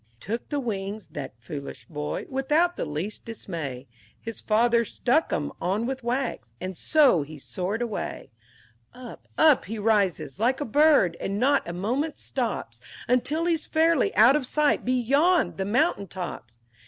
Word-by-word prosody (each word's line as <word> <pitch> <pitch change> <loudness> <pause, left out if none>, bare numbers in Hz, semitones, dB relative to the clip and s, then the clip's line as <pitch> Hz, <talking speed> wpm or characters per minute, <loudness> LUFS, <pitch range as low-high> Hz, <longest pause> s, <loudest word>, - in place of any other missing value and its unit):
IX 110 - -39 0.2
He - - -6
took 230 +1 -3
the 290 - -1
wings 205 -4 -4
that 140 -4 -7
foolish 140 +4 -8
boy 150 -4 -4
without 300 +6 +1
the - - -3
least 160 +8 -4
dismay; 160 - -5 0.3
His 230 -1 -7
father 235 +2 +3
stuck 250 +7 0
'em 145 - -1
on 200 +6 0
with 265 0 -4
wax, 240 - -3
and 185 0 -5
so 275 - +4
he 150 +2 -8
soared 190 - -3
away; 225 -4 -5 0.6
Up, 250 -2 -11
up 310 -4 +5
he 220 +3 -5
rises, 195 - +1
like 245 +4 +2
a 290 - -2
bird, 280 - +4
and 195 +1 -2
not 275 +3 +2
a - - -4
moment 250 - -2
stops 220 - -3 0.3
Until 285 +7 +1
he's 330 -2 0
fairly 325 -2 +3
out 230 +6 +7
of 280 -4 0
sight 300 +1 +2
beyond 275 +8 +2
the 190 - -1
mountain 235 - +1
tops! 120 - -7
230 Hz, 165 wpm, -26 LUFS, 180-275 Hz, 0.6 s, out